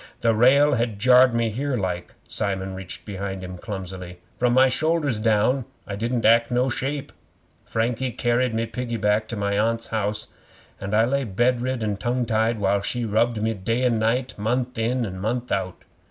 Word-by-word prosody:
'The 115 -1 +3
rail 140 +6 +5
had 115 -4 -1
jarred 125 +3 +6
me 115 0 +1
in 110 - -2
here 135 +2 -1
like.' 90 -3 -4
Simon 95 -1 -2
reached 95 -1 -7
behind 95 -2 -5
him 90 0 -7
clumsily. 90 -2 -7 0.2
'From 120 -1 +2
my 130 +1 +6
shoulders 150 -2 +1
down 110 +4 +2 0.2
I 100 - -5
didn't 115 +3 -1
act 115 +1 +5
no 125 +1 +1
shape. 140 +3 -3 0.5
Frankie 115 +3 -1
carried 120 +1 +1
me 115 +1 0
piggyback 110 -2 -1
to 115 - -5
my 100 0 0
Aunt's 115 +1 0
house, 110 -1 -2 0.5
and 100 +2 -2
I 110 +1 +5
lay 140 +3 0
bed 120 +3 +1
rid 130 -2 -2
and 105 -2 -2
tongue 120 +2 0
tied 110 +1 +1
while 100 -1 +1
she 120 +4 -2
rubbed 110 +1 +1
me 110 0 +1
day 115 +5 -1
and 120 -3 +2
night, 120 +2 -1
month 125 +4 -1
in 120 +2 0
and 95 -2 -6
month 120 +4 -2
out. 95 -2 -2
115 Hz, 185 wpm, -24 LUFS, 105-125 Hz, 0.5 s, jarred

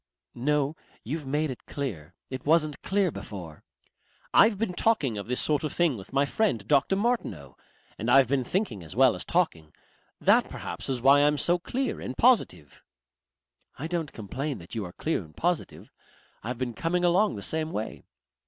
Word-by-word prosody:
"No. 145 +3 0 0.3
You've 145 +4 -4
made 150 +1 0
it 125 - -10
clear. 90 - -5 0.2
It 130 -1 -5
wasn't 155 -1 +2
clear 195 -2 +1
before." 90 - -8 0.7
"I've 220 -2 +6
been 210 -3 -1
talking 175 - +1
of 100 0 -5
this 125 +1 0
sort 150 -1 +1
of 155 - -2
thing 170 -6 +2
with 100 -3 -10
my 140 +1 +2
friend 135 - 0
Dr. 145 +6 +3
Martineau. 235 +4 -2 0.4
And 115 - -2
I've 135 0 +6
been 135 0 +1
thinking 175 - -2
as 80 +2 -9
well 130 +1 +5
as - - -3
talking. 85 - -1 0.4
That - - +4
perhaps - - -6
is 125 -3 -2
why 140 +2 +7
I'm 150 +1 +3
so 175 +4 +2
clear 260 +8 -3
and 130 - -6
positive." 225 - +2 1.0
"I 145 - -5
don't 165 -2 -2
complain 130 +6 -4
that 85 +1 -12
you 110 - -2
are 90 - -9
clear 160 - -2
and 80 0 -18
positive. 175 -1 -2 0.5
I've 120 +3 -4
been 125 -1 -3
coming 175 +7 0
along 185 - +3
the 100 - -6
same 160 0 -1
way.... 110 - -5
140 Hz, 180 wpm, -27 LUFS, 115-170 Hz, 1.0 s, why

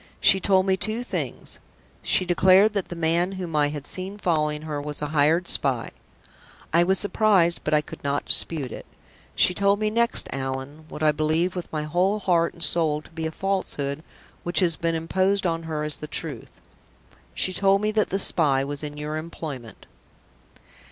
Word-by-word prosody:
She 195 - +4
told 190 0 +3
me 190 -1 +1
two 220 +5 -2
things. - - -5 0.4
She 185 - +2
declared 190 +4 +4
that 200 -3 -2
the 175 - -6
man 170 +3 0
whom 180 -4 -5
I 145 -1 +3
had 145 -1 -6
seen 190 +2 -4
following 150 -5 -1
her 150 -2 -4
was 150 0 -3
a 150 - -3
hired 155 +4 +2
spy. 130 -4 +3 0.8
I 170 +1 +5
was 190 +2 +2
surprised, 200 -5 +2
but - - +1
I 150 - +3
could - - -12
not 140 0 -1
dispute 145 -7 +2
it. - - -9 0.5
She 180 - +4
told 200 +2 +2
me 215 0 0
next, 235 +1 +2
Allan 135 +3 -5
what 150 - -6
I 155 - +5
believe 155 +4 0
with 180 - -6
my 155 -1 -2
whole 180 +7 +1
heart 175 -4 +1
and 170 - -5
soul 155 -3 +1
to - - -18
be 160 -1 -4
a - - -5
falsehood 160 -6 -2 0.4
which 175 -3 0
has 170 -3 +2
been 165 +1 -1
imposed 190 +4 0
on 165 -1 0
her 155 -1 -2
as 150 -1 -2
the 150 - -8
truth 150 - -7 0.8
she 185 - 0
told 195 +1 +3
me 215 0 0
that 215 -1 +1
the 195 - -1
spy 145 -8 +2
was 145 +1 -5
in 150 -1 -7
your 150 +1 -4
employment!" 155 -7 -8
165 Hz, 190 wpm, -24 LUFS, 150-190 Hz, 0.8 s, I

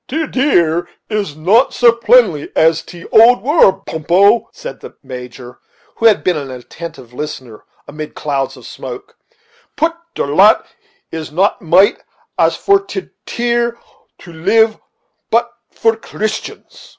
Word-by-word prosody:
"Ter 315 +4 -2
teer 175 - +1 0.2
is 205 -8 -2
not 200 - +2
so 240 -1 +5
plenty 230 -9 +2
as 160 0 +3
in - - -24
tee 175 -1 -11
old 230 -1 +6
war, 240 - +3
Pumppo," 190 +8 +2
said - - -9
the - - -12
Major, 125 -1 -10 0.4
who 230 - +4
had 215 - +3
been 180 - +1
an 140 -3 -5
attentive 130 0 -10
listener, 125 -5 -7 0.2
amid 155 +1 -8
clouds 140 -2 -3
of - - -14
smoke; 445 0 -9 0.6
"put 330 +1 +1 0.2
ter - - -1
lant 190 +10 +4 0.5
is 160 -2 -6
not 190 +6 0
mate 180 +4 +4 0.4
as - - +3
for 395 0 +2
ter 385 -1 -7 0.2
teer 235 0 -1 0.4
to 170 - -14
live 215 +7 +3
on, - - -28 0.5
put 235 +1 +2 0.2
for 225 0 0
Christians." 220 - -6
195 Hz, 145 wpm, -16 LUFS, 155-235 Hz, 0.6 s, old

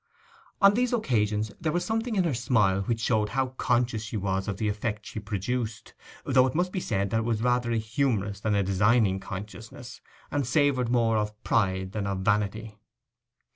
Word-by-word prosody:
On 200 0 +8
these 245 +2 +1
occasions 110 - 0
there 155 - 0
was 175 +2 -1
something 225 +1 -1
in 190 - +3
her 165 -5 0
smile 110 -6 +2
which 115 +3 -1
showed 110 -3 +1
how 130 +3 0
conscious 120 -2 +1
she 110 0 -5
was 95 0 -1
of 100 -3 -3
the 110 - -1
effect 105 0 -3
she - - -6
produced, 110 +3 -4 0.3
though 130 -1 +4
it 130 - -4
must 180 +2 +1
be 185 - -2
said 100 - -1
that 115 - +2
it - - -1
was 115 -1 -1
rather 125 -1 +1
a 115 - +1
humorous 110 -3 -1
than 105 0 0
a 100 - +2
designing 100 +1 +2
consciousness, 110 +5 -9 0.3
and 140 -4 -1
savoured 135 -3 +2
more 115 -2 +2
of 105 0 -3
pride 95 -2 0
than 100 -1 -3
of 95 -1 -2
vanity. 105 +2 -1
110 Hz, 190 wpm, -27 LUFS, 105-125 Hz, 0.3 s, On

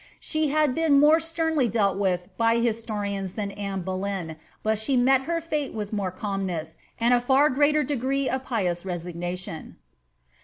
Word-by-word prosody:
She 310 -1 -1
had 300 -2 +2
been 315 -2 +4
more 305 +3 +6
sternly 320 -4 0
dealt 205 -3 +1
with 185 -3 0
by 230 0 +3
historians 210 -5 -2
than 205 -2 -3
Anne 195 -2 -4
Boleyn, 185 -3 -3 0.3
but 220 -1 +1
she 260 +4 +1
met 265 +2 +4
her 335 0 +1
fate 300 -5 -3
with 210 -1 -4
more 200 -3 -1
calmness, 185 -4 -4 0.2
uid 240 +2 +4
a 240 - +1
far 270 +4 +4
greater 295 +3 +3
de^ce 275 0 -1
of 260 0 -1
pious 185 -9 -1
resignation. 175 -1 -5
225 Hz, 160 wpm, -25 LUFS, 190-275 Hz, 0.3 s, more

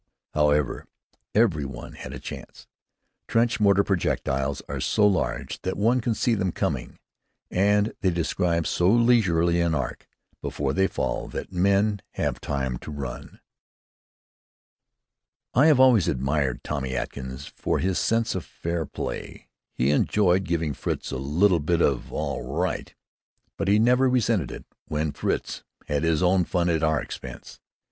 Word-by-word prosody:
However, 75 -1 +1 0.5
every 100 -10 +3
one 65 -3 -7
had - - -8
a - - -7
chance. - - -9 0.6
Trench 115 0 +2
mortar 100 -1 +4
projectiles 70 -8 -1
are - - -4
so 105 - +2
large 85 -11 0
that 95 - -3
one 115 +5 +2
can 115 0 0
see 120 - +1
them 95 -4 0
coming, - - -3 0.5
and 105 +3 +2
they 95 - +3
describe 85 -1 0
so 90 +1 +2
leisurely 95 -8 +3
an 85 -2 +1
arc 65 -5 -4 0.3
before 70 -2 -2
they 95 +5 +3
fall 65 -8 -2
that - - -6
men 100 +2 +2
have - - -2
time 65 -3 -2
to - - -9
run. 70 -2 -7 2.1
I 140 +6 +5
have 150 -5 +5
always 125 -8 +6
admired 70 -1 0
Tommy 65 -3 -3
Atkins 65 +1 -5
for - - -1
his 95 0 0
sense 115 0 +1
of 95 - -3
fair 85 -2 -4
play. - - -6 0.2
He 65 +3 +1
enjoyed 95 +4 +2
giving 80 -3 -1
Fritz - - -4
"a 65 - -2
little 85 +7 +2
bit 80 +3 +1
of 70 -7 +1
all - - -3
right," - - -2 0.6
but 100 - -3
he 100 +1 +5
never 125 +4 +4
resented 115 - +1
it - - -8 0.2
when 75 0 -1
Fritz - - -2 0.2
had 75 -1 -1
his 80 +1 +1
own 90 0 +4
fun 85 0 0
at 80 - 0
our 80 -1 +2
expense. - - -8
85 Hz, 150 wpm, -25 LUFS, 75-105 Hz, 2.1 s, always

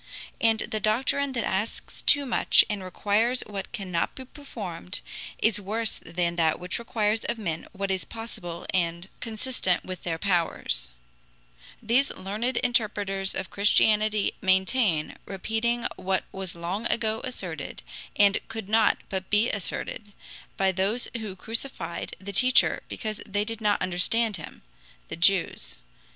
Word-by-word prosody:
"And 225 -1 +4
the 215 - -2
doctrine 260 +6 +1
that 235 -4 -1
asks 200 +4 -3
too 285 -1 +4
much, 245 - +5
and 210 -2 -2
requires 215 +6 +1
what 200 -2 -6
cannot 185 -7 -2
be 260 - -7
performed, 205 - -6 0.4
is 220 -1 +3
worse 220 +3 0
than 170 0 -1
that 160 -2 +2
which 180 +4 -3
requires 220 -2 0
of - - -1
men 165 -7 -3
what 195 0 -2
is 190 -1 0
possible 175 -7 -7
and 170 0 0
consistent 220 -4 -1
with 185 -2 -6
their 165 -2 -2
powers," 175 - 0 0.9
these 245 +6 +3
learned 220 +6 -2
interpreters 205 -5 +1
of 190 - -4
Christianity 210 +1 +3
maintain, 190 -3 +2
repeating 225 +5 -1
what 190 0 0
was 190 -3 -4
long 180 +7 -2
ago 220 -1 0
asserted, 180 - -5 0.3
and 200 -1 +5
could 225 -3 -6
not 220 0 +4
but 190 -1 -4
be 210 +3 +3
asserted, 205 +1 -4 0.4
by 190 -1 +3
those 195 +6 +1
who 215 -4 -4
crucified 220 -4 -4
the 200 +1 -7
Teacher 255 +5 +5
because 215 -2 -4
they 205 +1 0
did 225 0 -5
not 210 -1 +3
understand 205 +4 +1
him 155 - -10 0.5
the - - -4
Jews. 175 - +2
205 Hz, 140 wpm, -27 LUFS, 185-225 Hz, 0.9 s, much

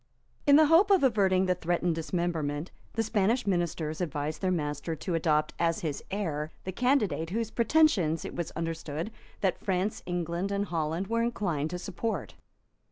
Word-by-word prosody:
In 285 - +8
the 310 +1 +7
hope 330 +7 +5
of 385 -6 +5
averting 195 -7 +3
the 185 - +3
threatened 175 0 0
dismemberment, 160 -2 -2 0.2
the 225 - 0
Spanish 225 +3 +1
ministers 170 -4 -1
advised 155 -2 -3
their 190 - +1
master 150 -2 -2
to 150 +5 -4
adopt 155 -2 +1
as 165 -1 +1
his 150 -4 -3
heir 160 -7 -2
the 185 - -4
candidate 215 - +1
whose 225 +3 -2
pretensions 225 - +3
it - - -6
was 170 -2 -2
understood 165 +2 -3 0.3
that 190 -3 0
France, 190 +2 0
England 175 +2 -2
and 200 0 0
Holland 165 +1 -1
were 230 +3 0
inclined 180 -11 -1
to 180 - -4
support. 195 - -3
175 Hz, 165 wpm, -29 LUFS, 160-210 Hz, 0.3 s, In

